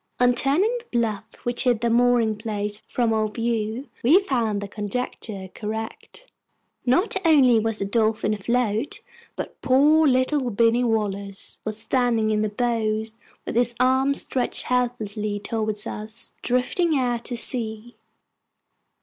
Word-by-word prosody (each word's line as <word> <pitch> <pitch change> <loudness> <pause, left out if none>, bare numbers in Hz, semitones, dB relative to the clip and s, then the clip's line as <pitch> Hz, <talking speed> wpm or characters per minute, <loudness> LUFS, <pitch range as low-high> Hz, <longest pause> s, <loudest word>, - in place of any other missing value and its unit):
On 245 0 +5
turning 315 - +2
the 470 - -18
bluff 220 -2 -1 0.2
which 240 +2 0
hid 240 -3 +2
the 235 - +1
mooring 240 -2 +3
place 210 -1 -4
from 235 -2 0
our 215 -1 +1
view, 230 +3 -2
we 300 +11 +6
found 235 - -1
the 205 - -5
conjecture 205 -2 -5
correct. 220 - -6 0.6
Not 370 - +3
only 270 -8 +5
was 225 0 -1
the 200 - -1
Dolphin 215 0 +1
afloat, 230 +4 -1 0.3
but - - -7
poor 295 +4 +5
little 255 0 +2
Binny 230 +2 +3
Wallace 200 -4 -2
was 215 -1 -4
standing 230 -2 +1
in 210 0 +1
the 215 - 0
bows 220 -1 -1 0.3
with - - -4
his 240 0 +1
arms 260 +2 +3
stretched 255 -2 0
helplessly 215 -4 -1
towards 215 -1 -2
us 220 +2 -4
drifting 290 +6 +1
out 245 -2 -1
to 240 - -2
sea! 230 -1 -3
230 Hz, 140 wpm, -24 LUFS, 215-250 Hz, 0.6 s, we